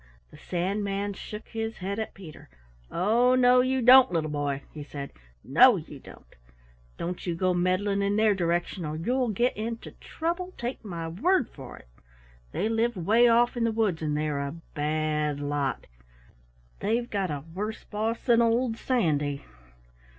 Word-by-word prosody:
The 150 - -14
Sandman 200 +3 -2
shook 210 +2 -9
his 225 0 -4
head 195 +3 -4
at 220 - -5
Peter. 165 - -12 0.4
"Oh, 235 +8 +3
no, 250 0 +5
you 260 0 0
don't, 255 0 +8
little 160 -3 -1
boy," 145 -2 -2
he 150 - -7
said. 140 -1 -7 0.3
"No, 205 - +6
you 155 -4 -9
don't! - - -16 0.6
Don't 180 +2 -5
you 170 - -1
go 185 +1 +1
meddling 185 +3 +1
in 200 0 +1
their 215 0 +4
direction 175 0 -1
or 150 0 -4
you'll 245 +10 0
get 240 +4 +1
into 225 +2 -5
trouble, 350 +3 -4
take 240 +1 -5
my 170 -5 -5
word 265 - +1
for 135 -3 -10
it. - - -16 0.6
They 210 - -1
live 225 +1 0
way 220 +8 +4
off 240 +1 +3
in 240 - -1
the 230 - +2
woods 215 -7 0
and 150 -1 -1
they're 150 -1 -1
a 140 0 -3 0.2
bad 150 -1 -1
lot. 145 -1 -2 0.9
They've 235 +3 0
got 195 -5 -2
a 145 -2 -4
worse 210 +4 -4
boss 220 +2 -3
than 235 -2 +5
old 230 0 +1
Sandy! 150 - 0
200 Hz, 165 wpm, -27 LUFS, 155-230 Hz, 0.9 s, don't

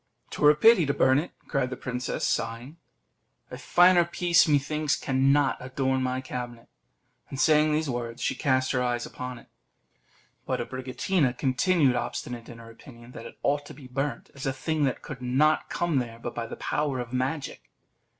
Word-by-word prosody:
"'Twere 150 - +4
a 150 - +5
pity 220 +3 +6
to 140 -1 -1
burn 130 +1 +4
it," 165 - -4 0.2
cried 125 -2 0
the 130 - -6
princess, 125 0 -3
sighing; 120 +7 -3 0.7
"a - - -6
finer 175 0 +5
piece, 170 0 +3
methinks, 150 0 +1
cannot 135 0 +2
adorn 130 +1 -1
my 130 0 -1
cabinet." 120 -2 -7 0.6
And 135 - -6
saying 155 0 +4
these 155 +1 0
words, 120 -2 -4
she - - 0
cast 130 -3 +1
her 125 - 0
eyes 120 -1 -1
upon 125 -1 -7
it. 120 - -15 1.0
But - - -1
Abricotina 130 +2 -1
continued 140 0 +2
obstinate 120 -1 -4
in 120 - -10
her 115 0 -12
opinion 120 0 -14
that 115 -1 -9
it - - -14
ought 145 +1 +1
to - - -11
be 140 -1 -13
burnt, 135 +3 -4
as 140 0 -6
a 135 - 0
thing 150 +3 -1
that 130 - -2
could 135 -5 -8
not 135 +5 +2
come 170 -5 0
there 115 -2 -5
but 120 +1 -6
by 115 -1 -4
the - - -7
power 145 -3 -2
of 120 0 -6
magic. 135 +3 -3
130 Hz, 180 wpm, -27 LUFS, 125-150 Hz, 1.0 s, pity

